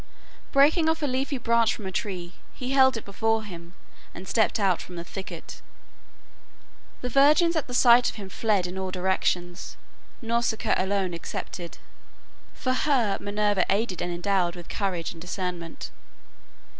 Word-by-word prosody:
Breaking 310 +4 +4
off 320 -1 0
a - - +3
leafy 270 +1 -1
branch 235 -2 +2
from 210 - -9
a 190 - -3
tree, 185 -3 -4 0.2
he 255 0 -4
held 265 -2 +5
it 225 - -7
before 225 +2 0
him 175 -3 -10 0.4
and 185 - -9
stepped 220 -1 +2
out 190 -4 +2
from 180 - -10
the 170 - -5
thicket. 190 +2 -8 1.4
The 250 - -2
virgins 300 +6 +5
at 300 -5 -2
sight 245 -1 +6
of - - -8
him 205 -3 -7
fled 200 -1 0
in 180 +1 -4
all 190 0 -3
directions, 180 -1 -1 0.5
Nausicaa 230 -1 0
alone 190 -1 0
excepted, 170 +1 -6 0.8
for 255 - -1
HER 255 -7 +1
Minerva 205 -2 +1
aided 200 -1 0
and 175 - -2
endowed 175 0 0
with 175 -1 -10
courage 185 -5 -2
and 165 - -12
discernment. 180 -2 -5
205 Hz, 150 wpm, -26 LUFS, 180-245 Hz, 1.4 s, sight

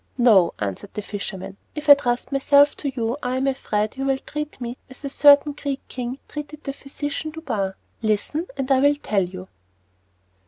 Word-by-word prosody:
"No," 215 -9 +5
answered 100 - -5
the 210 - -3
fisherman, 195 -1 -6 0.2
"if 300 0 -5
I 290 - +12
trust 245 -3 -1
myself 280 +1 +5
to 285 - -2
you 240 -1 -2
I 250 +1 -1
am 265 - 0
afraid 215 -5 -1
you 270 - -2
will 270 -1 +2
treat 300 +2 -6
me 240 0 -5
as 260 +2 -10
a - - -2
certain 290 +1 +6
Greek 280 -1 -5
king 250 0 -4
treated 300 0 -8
the 275 - -4
physician 290 +3 -5
Douban. 220 -12 -3 0.3
Listen, 225 - -1
and 270 0 -2
I 265 - +5
will 285 +2 +4
tell 210 -9 0
you." 185 +1 -7
265 Hz, 185 wpm, -23 LUFS, 215-285 Hz, 0.3 s, I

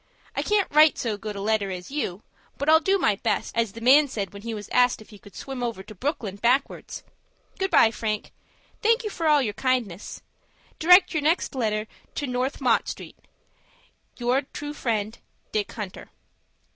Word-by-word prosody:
I - - 0
can't 415 -2 +1
write 305 +1 +6
so 225 -3 -2
good 210 0 -6
a 200 - -5
letter 210 -1 0
as 180 +4 -7
you; 220 -10 -3 0.3
but, 285 - -3
I'll 320 +1 +7
do 385 +5 +2
my 210 - +2
best, - - -2
as 230 -3 0
the 230 - -9
man 280 +5 +6
said 200 -7 -4
when 200 - -9
he 230 +2 -5
was 210 -2 -6
asked 250 0 +3
if 215 - -15
he 205 - -13
could 205 -1 -16
swim 270 -2 -6
over 230 -5 -3
to 215 - -11
Brooklyn 215 - -3
backwards. 250 +6 0 0.6
Good 385 0 0
by, 230 -10 +5
Frank. 215 -1 -3 0.5
Thank 455 +2 +3
you 425 - -4
for 330 -4 -2
all 295 -2 +5
your 210 -4 -2
kindness. 235 -7 -2 0.6
Direct 360 +3 +6
your 310 - 0
next 320 +4 +1
letter 215 -4 -1 0.3
to 290 - -2
No. 250 0 0
— - - -14
Mott 250 -5 +2
Street. - - -8 1.0
"Your 245 +2 +1
true 295 +1 -7
friend, 220 -5 -2 0.3
"DICK 210 -2 -1
HUNTER." 205 -4 -7
240 Hz, 190 wpm, -25 LUFS, 210-295 Hz, 1.0 s, I'll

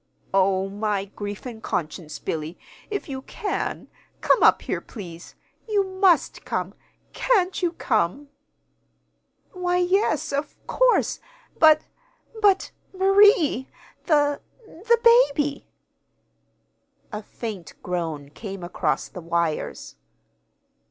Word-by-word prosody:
"Oh, 190 0 +2
my 205 0 -2
grief 205 +2 -7
and 230 -3 -7
conscience, 155 -3 -4
Billy, 160 +1 -4 0.3
if 410 -2 -4
you 265 -2 -5
can, 405 - -4 0.3
come - - +3
up - - +5
here, - - -3
please. 175 -6 -10 0.3
You 410 -2 +3
must 375 -2 +2
come! - - -3 0.4
Can't 385 -8 +1
you 350 -2 0
come?" 245 - -1 1.2
"Why, 360 -1 -1
yes, 355 -5 +1
of 285 +1 -2
course. - - +2 0.4
But 310 -1 +7 0.6
but 395 -2 +3 0.2
Marie! 385 - +4 0.4
The 290 -3 +2 0.2
the 450 +5 0 0.4
baby!" 290 -1 -2 1.4
A 210 -1 -4
faint 205 -5 -7
groan 165 -5 -3
came 195 0 -8
across 175 - -1
the 180 - -9
wires. 170 -1 -2
275 Hz, 105 wpm, -24 LUFS, -, 1.4 s, But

